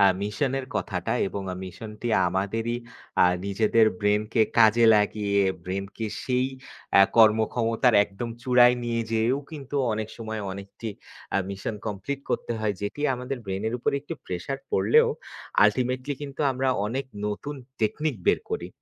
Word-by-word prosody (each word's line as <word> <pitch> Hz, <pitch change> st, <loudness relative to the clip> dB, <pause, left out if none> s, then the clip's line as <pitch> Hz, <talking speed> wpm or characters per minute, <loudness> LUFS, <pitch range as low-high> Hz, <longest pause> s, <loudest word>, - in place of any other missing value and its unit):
এ্যা 100 Hz, -, +7 dB
মিশনের 135 Hz, +5 st, -1 dB
কথাটা 90 Hz, -4 st, -2 dB, 0.2 s
এবং 100 Hz, 0 st, -5 dB, 0.2 s
মিশন 95 Hz, +4 st, -8 dB
টি 120 Hz, -, -2 dB, 0.2 s
আমাদেরই 110 Hz, +6 st, -1 dB, 0.5 s
আ -, -, +7 dB, 0.2 s
নিজেদের 110 Hz, +2 st, +3 dB
ব্রেইনকে 105 Hz, +2 st, +2 dB, 0.2 s
কাজে 115 Hz, +1 st, +6 dB
লাগিয়ে, 105 Hz, -1 st, +2 dB, 0.2 s
ব্রেইন 95 Hz, +1 st, -3 dB
কে 110 Hz, -, -2 dB, 0.2 s
সেই 125 Hz, 0 st, +1 dB, 0.5 s
এ্যা 100 Hz, -, +9 dB
কর্মক্ষমতার 115 Hz, +2 st, +4 dB
একদম 100 Hz, +4 st, -6 dB
চূড়ায় 125 Hz, -1 st, +6 dB
নিয়ে 115 Hz, -1 st, 0 dB
যেয়েও 115 Hz, +4 st, +2 dB
কিন্তু 145 Hz, -2 st, -6 dB, 0.2 s
অনেক 110 Hz, 0 st, -3 dB
সময় 110 Hz, -1 st, -5 dB
অনেকটি 100 Hz, +3 st, -7 dB, 0.5 s
আ -, -, +4 dB
মিশন 100 Hz, +2 st, -4 dB
কমপ্লিট 110 Hz, +7 st, -4 dB
করতে -, -, -1 dB
হয়। 105 Hz, -2 st, 0 dB
যেটি 100 Hz, +8 st, -4 dB
আমাদের 125 Hz, +2 st, -4 dB
ব্রেইনের 100 Hz, +4 st, -2 dB
উপরে 120 Hz, -, 0 dB
একটু 155 Hz, +3 st, -6 dB
প্রেশার 90 Hz, +10 st, -4 dB
পড়লেও, 95 Hz, +1 st, +4 dB, 0.6 s
আল্টিমেটলি 130 Hz, +6 st, +1 dB
কিন্তু 140 Hz, -1 st, -7 dB
আমরা 130 Hz, +1 st, 0 dB, 0.2 s
অনেক 130 Hz, +5 st, -2 dB, 0.2 s
নতুন 105 Hz, +8 st, -4 dB, 0.3 s
টেকনিক 150 Hz, +7 st, 0 dB
বের -, -, +4 dB
করি। -, -, -3 dB
110 Hz, 145 wpm, -26 LUFS, 105-125 Hz, 0.6 s, এ্যা